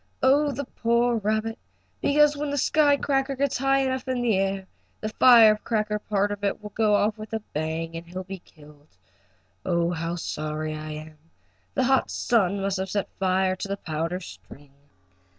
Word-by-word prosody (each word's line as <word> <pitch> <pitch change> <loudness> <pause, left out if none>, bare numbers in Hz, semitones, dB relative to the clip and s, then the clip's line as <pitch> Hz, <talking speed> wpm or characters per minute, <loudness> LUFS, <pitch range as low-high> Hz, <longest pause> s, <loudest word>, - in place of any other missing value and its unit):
Oh 285 +3 +4
the 280 +2 -4
poor 235 0 +1
rabbit! 220 +2 -1 0.4
Because 295 +1 +4
when 290 0 -3
the 285 - -2
sky 290 +1 +3
cracker 275 -1 0
gets 275 -1 -1
high 270 +1 +3
enough 260 0 -2
in 255 -1 -1
the 230 -4 +2
air 195 0 -1 0.3
the 215 - -3
firecracker 215 -2 +5
part 205 -1 0
of 205 0 -6
it 200 - 0
will 210 -1 -9
go 215 -1 +2
off 210 +1 +1
with 215 +1 -9
a 220 - 0
bang, 160 +2 -3
and 165 +1 -7
he'll 185 +2 -6
be 190 0 -8
killed. 150 - -20 0.7
Oh, 170 -1 +1
how 165 0 -3
sorry 155 -2 -4
I 155 0 -6
am. 155 0 -10 0.6
The 265 - +2
hot 265 +1 +2
sun 200 -5 +1
must 195 0 -1
have 190 0 -3
set 200 0 -2
fire 185 0 +1
to 200 - -5
the 200 0 -3
powder 165 +1 -3
string." 145 -5 -13
205 Hz, 180 wpm, -25 LUFS, 170-245 Hz, 0.7 s, firecracker